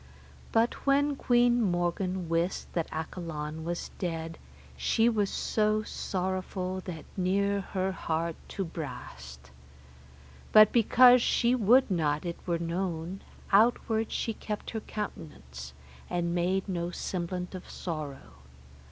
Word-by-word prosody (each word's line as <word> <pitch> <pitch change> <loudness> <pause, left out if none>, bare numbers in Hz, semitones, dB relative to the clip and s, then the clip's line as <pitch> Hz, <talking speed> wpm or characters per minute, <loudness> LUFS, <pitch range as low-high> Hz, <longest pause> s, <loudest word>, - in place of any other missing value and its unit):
But 230 +4 +1
when 285 +1 +3
Queen 240 -2 +3
Morgan 180 -1 0
wist 165 +2 -1
that 165 -2 -2
Accolon 160 -1 -5
was 170 +1 -4
dead, 165 -2 -3 0.4
she 225 0 +2
was 210 -4 +2
so 215 0 +1
sorrowful 185 -1 -3
that 165 -4 -6
near 200 +2 +1
her 190 0 -2
heart 165 -2 -2
to 195 - -3
brast. 70 - -8 1.0
But 215 -1 +8
because 245 +2 +7
she 240 +1 +2
would 250 0 +4
not 155 -3 0
it 170 -1 -4
were 170 -1 +1
known, 170 +1 -3 0.3
outward 220 +1 +3
she 225 - -1
kept 210 -1 -5
her 225 - -3
countenance, 65 - -7 0.4
and 170 -1 -1
made 185 +3 0
no 175 -2 -2
semblant 180 0 -4
of 185 - -8
sorrow. 145 - -6
185 Hz, 120 wpm, -29 LUFS, 165-210 Hz, 1.0 s, But